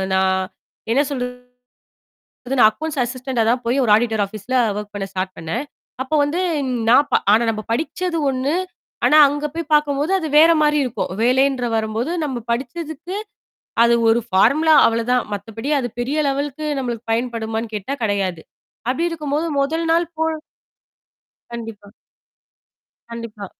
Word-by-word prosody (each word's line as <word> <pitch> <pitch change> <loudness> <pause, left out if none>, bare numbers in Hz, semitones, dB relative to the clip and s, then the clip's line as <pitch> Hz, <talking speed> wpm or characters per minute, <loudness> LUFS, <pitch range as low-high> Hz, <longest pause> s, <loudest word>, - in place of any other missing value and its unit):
அ - - 0
நான் 190 0 +2 0.5
என்ன 275 +4 +4
சொல்றது? 250 -3 -3 1.2
அது 270 +2 -1
நான் 215 - +8
அக்கவுண்ட்ஸ் 300 +6 -5
அசிஸ்டன்டா 250 -1 -2
தான் 245 +2 +1
போய் 250 +4 +1
ஒரு 225 - +2
ஆடிட்டர் 220 -1 +1
ஆஃபீஸ்ல 215 +5 -5 0.2
ஒர்க் 210 0 -7
பண்ண 200 -1 -3
ஸ்டார்ட் 185 0 -3
பண்ணேன். 165 - -3 0.4
அப்போ 295 +4 -2
வந்து 295 +5 -1 0.5
நான் 270 +4 +5
ப - - -4 0.2
ஆனா 225 +2 +4
நம்ம 215 -1 -5
படிச்சது 330 +7 -1
ஒண்ணு, 270 +3 -1 0.5
ஆனா 305 - +5
அங்க 290 +1 -3
போய் 330 -2 -4
பாக்கும்போது 295 +2 +2
அது 320 - -3
வேற 325 +2 +8
மாரி 300 0 +3
இருக்கும். 250 -7 -3
வேலைன்ற 260 +1 +2
வரும்போது 220 +6 -1
நம்ம 250 -5 -4
படிச்சதுக்கு, 315 +8 -4 0.7
அது 235 0 +4
ஒரு 235 +1 +3
ஃபார்முலா 285 +12 +4
அவ்வளோதான், 230 +2 +1
மத்தபடி 225 +7 -5
அது 245 -2 -3
பெரிய 270 +5 -2
லெவல்கக்கு 285 +2 -3
நம்மளுக்கு 240 -3 -5
பயன்படுமான்னு 225 -1 -3
கேட்டா 210 +7 -3
கிடையாது. 195 -5 -1 0.5
அப்டி 335 +6 -1
இருக்கும்போது 305 0 -2
முதல் 320 +4 -1
நாள் 340 0 +2
போ - - +2 1.3
கண்டிப்பா. 225 -3 -8 1.2
கண்டிப்பா. 230 -3 -7
250 Hz, 140 wpm, -20 LUFS, 225-290 Hz, 1.3 s, நான்